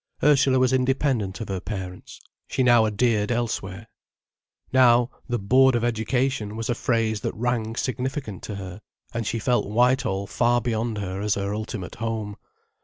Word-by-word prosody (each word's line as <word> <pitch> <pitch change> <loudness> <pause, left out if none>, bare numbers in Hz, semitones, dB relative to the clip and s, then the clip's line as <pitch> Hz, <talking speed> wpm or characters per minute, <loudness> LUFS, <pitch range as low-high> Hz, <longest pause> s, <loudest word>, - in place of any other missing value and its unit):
Ursula 135 -3 +4
was 130 0 +3
independent 130 -6 0
of 110 - -6
her 95 -1 -2
parents. 95 -2 -7 0.3
She 130 - 0
now 120 -3 +5
adhered 110 0 +1
elsewhere. 110 -4 -3 0.9
Now, 125 -1 +5 0.2
the 120 - 0
'Board 130 +5 +4
of 120 - 0
Education' 120 -1 -1
was 115 +2 -2
a - - +2
phrase 115 -3 0
that - - -3
rang 115 -1 -1
significant 130 - -3
to 105 - -5
her, 95 0 -8 0.3
and 115 -2 -3
she 115 - -1
felt 120 +1 +1
Whitehall 120 -3 +2
far 120 +4 +2
beyond 115 -2 -2
her 95 -1 -4
as 105 0 +1
her 100 0 -2
ultimate 105 -3 -5
home. 110 -2 -3
115 Hz, 160 wpm, -24 LUFS, 105-125 Hz, 0.9 s, now